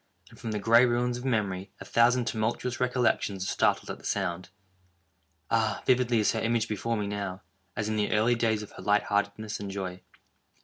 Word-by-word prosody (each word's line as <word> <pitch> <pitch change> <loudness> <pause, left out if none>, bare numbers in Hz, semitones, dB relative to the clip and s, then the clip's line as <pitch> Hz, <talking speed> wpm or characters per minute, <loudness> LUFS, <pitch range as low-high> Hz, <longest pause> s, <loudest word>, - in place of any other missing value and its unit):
—and - - -16
from 115 - -5
the 105 - -1
gray 115 +4 +5
ruins 120 0 +1
of - - -9
memory 100 -6 -1
a - - -9
thousand 120 +1 +3
tumultuous 115 +3 -2
recollections 125 -6 +1
are - - -3
startled - - +1
at - - -6
the - - -19
sound! 90 +1 -2 1.0
Ah, 110 -2 +1
vividly 125 -2 +3
is 105 - +3
her 110 - -2
image 115 0 +1
before 115 +2 -2
me 105 - -1
now, 100 -1 -4 0.3
as 105 - -2
in 110 0 -1
the 105 - 0
early 110 +3 +3
days 110 -2 0
of 105 - -11
her - - -11
light 105 0 +3
heartedness 105 +1 -1
and 100 -1 -5
joy! 95 -2 -5
110 Hz, 200 wpm, -28 LUFS, 100-120 Hz, 1.0 s, gray